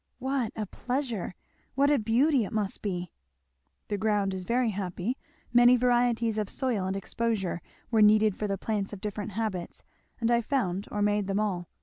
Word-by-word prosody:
"What 265 -3 -1
a 215 - -2
pleasure! 245 -4 -3 0.4
What 280 +2 +4
a 290 - +4
beauty 245 +5 +3
it 200 - -5
must 210 -2 -2
be!" 180 -4 -3 0.8
"The 205 -1 -2
ground 205 -2 +1
is 185 -1 -4
very 240 +1 +1
happy 190 +4 -3 0.4
many 245 +1 +7
varieties 240 -2 +2
of 210 - -2
soil 230 -8 -1
and 190 - -1
exposure 195 -4 -1 0.3
were 220 -2 +4
needed 210 -1 +5
for 210 - -2
the 195 -1 -1
plants 205 0 -2
of 200 - -6
different 210 +1 -4
habits, 200 -5 -3 0.4
and 230 0 +1
I 235 0 +4
found 200 -7 -1
or 205 0 -1
made 205 -1 +1
them 200 +1 0
all. 185 -5 -1
215 Hz, 180 wpm, -28 LUFS, 195-240 Hz, 0.8 s, many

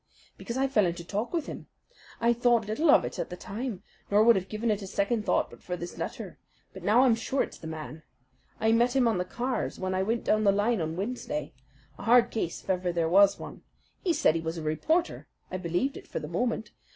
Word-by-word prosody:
"Because 235 - -5
I 270 +1 +2
fell 215 -8 +3
into 170 0 -4
talk 210 +6 -3
with 330 -4 -1
him. - - -8 0.5
I 235 +1 +3
thought 235 -2 +2
little 260 +10 0
of - - +6
it - - -6
at - - -3
the 180 - -7
time, 210 0 -5 0.3
nor 205 +1 +5
would 235 0 +7
have 190 0 -2
given 220 +1 -1
it 210 0 -1
a 195 - -6
second 210 +3 -1
thought - - +1
but - - -14
for 180 0 -4
this 175 +1 -7
letter; - - -6 0.3
but - - -9
now 220 +5 +4
I'm 255 -3 +5
sure 230 +4 0
it's - - -9
the 160 - -8
man. 155 0 -7 0.6
I 220 +1 +3
met 240 +3 +3
him 255 -3 +4
on 220 -5 +1
the 180 - -1
cars 245 +7 -3
when 185 0 -2
I 185 - +1
went 225 +4 -1
down 215 0 +2
the 200 - +5
line 205 +1 +1
on 160 0 -2
Wednesday 195 - -4 0.5
a - - -7
hard 240 +1 +5
case 175 -7 -3
if - - -17
ever 180 -1 0
there 170 -1 0
was 195 +3 +6
one. - - -9 0.4
He 360 - +2
said 320 - +3
he 165 - -2
was 165 +1 -4
a 160 - -5
reporter. 315 - 0 0.2
I 185 - -2
believed 180 +10 -1
it - - -10
for - - -5
the 150 - -4
moment. 220 +5 -2
210 Hz, 240 wpm, -28 LUFS, 180-240 Hz, 0.6 s, would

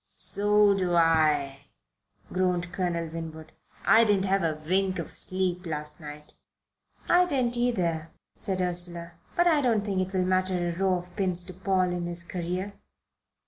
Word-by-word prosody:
"So 205 0 +4
do 180 -3 0
I," 150 -4 +2 0.7
groaned 180 -2 0
Colonel 175 -3 -1
Winwood. 160 -1 -8 0.3
"I 220 +3 +6
didn't 205 -3 +2
have 195 0 +1
a 160 -3 -1
wink 190 +1 +1
of - - -5
sleep 185 -1 0
last 150 0 -3
night." 150 0 -10 0.7
"I 360 +1 +4
didn't 255 -6 0
either," 175 -10 0 0.2
said 190 -3 -3
Ursula, 175 -1 -1 0.2
"but 350 - +3
I 320 -4 +4
don't 225 -6 +1
think 195 -3 0
it - - -12
will 185 - +1
matter 185 -1 0
a - - -6
row 190 +1 +1
of 180 0 -7
pins 185 -3 +1
to 185 - -9
Paul 185 0 0
in 175 -1 -3
his 170 0 -5
career." 180 +3 -4
180 Hz, 160 wpm, -27 LUFS, 170-195 Hz, 0.7 s, I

